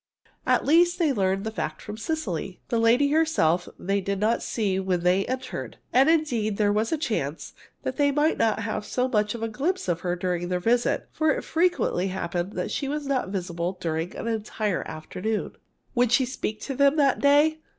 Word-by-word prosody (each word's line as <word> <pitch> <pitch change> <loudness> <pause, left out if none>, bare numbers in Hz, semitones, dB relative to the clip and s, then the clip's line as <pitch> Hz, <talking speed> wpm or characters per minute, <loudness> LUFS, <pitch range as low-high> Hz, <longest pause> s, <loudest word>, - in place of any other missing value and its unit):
At - - +3
least, 345 +4 +4
they 320 -6 +2
learned 195 -3 0
the 220 - -3
fact 220 - -4
from 210 - -7
Cecily. 215 - -3
The 235 - +1
lady 240 +5 +4
herself 295 - +2
they 195 +2 -1
did 195 +1 -2
not 220 +3 +1
see 200 -5 -1
when 185 -2 0
they 180 +2 +2
entered. 255 0 -5 0.2
And 265 +4 +5
indeed, 240 -11 +1
there 205 -1 +3
was 215 +2 0
a 320 - +1
chance, 190 - -3 0.3
that - - -3
they 285 -1 +3
might 295 +3 +1
not 220 -1 +2
have 215 -1 -3
so 250 +4 -1
much 210 -3 0
as 235 - -7
a - - 0
glimpse 320 - -2
of 170 -1 0
her 175 0 -1
during 175 -1 -2
their 180 0 0
visit, 235 +6 +1
for 315 0 +1
it - - 0
frequently 330 - +1
happened 185 0 -3
that - - -3
she 275 - -2
was 295 +1 -3
not 270 -7 -1
visible 180 -1 -3
during 165 +1 -3
an - - -5
entire 215 -3 -1
afternoon. 205 +7 -3 0.4
Would 245 -2 +2
she 255 +2 +4
speak 220 -4 -4
to 275 - -4
them 280 +2 +4
that 280 -3 +3
day? 295 +2 +4
220 Hz, 200 wpm, -25 LUFS, 190-280 Hz, 0.4 s, And